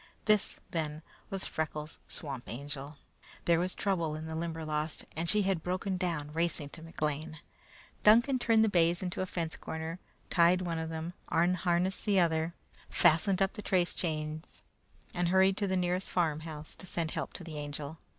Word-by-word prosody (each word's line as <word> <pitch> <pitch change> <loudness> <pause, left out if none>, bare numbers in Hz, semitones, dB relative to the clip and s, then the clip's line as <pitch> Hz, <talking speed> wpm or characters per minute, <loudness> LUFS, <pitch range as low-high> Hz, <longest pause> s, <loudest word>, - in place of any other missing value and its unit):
This, 215 -2 +3
then, 155 -3 -2 0.3
was 195 -1 -1
Freckles' 155 -1 -3
Swamp 135 -5 -3
Angel. 140 +3 -6 0.5
There 170 -1 +4
was 180 +1 0
trouble 170 -6 0
in 155 +1 -5
the 160 0 -4
Limberlost, 160 -2 -2
and 165 +2 -1
she 210 -1 +4
had 190 -3 +1
broken 185 +2 -1
down 165 -5 -2
racing 165 -3 0
to 160 - -9
McLean. 155 -1 -3 0.6
Duncan 240 +5 +6
turned 225 -2 +5
the - - +2
bays 175 -2 +3
into 180 0 -2
a 185 - -1
fence 165 -5 -2
corner, 160 +4 -5 0.3
tied 175 +1 +5
one 170 -2 -1
of 160 0 -3
them, 165 +2 -4 0.2
unharnessed 175 +2 +2
the 200 -3 +4
other, 165 -1 +2 0.3
fastened 185 +3 +4
up 195 - 0
the - - -6
trace 180 -3 +2
chains, 155 -1 -3 0.5
and 175 0 +1
hurried 190 +2 +5
to 205 - 0
the 190 0 +1
nearest 180 +1 0
farmhouse 155 -2 -1
to 185 - -6
send 165 -2 -1
help - - -3
to - - -7
the 155 -3 -6
Angel. 145 +1 -5
170 Hz, 170 wpm, -32 LUFS, 155-185 Hz, 0.6 s, Duncan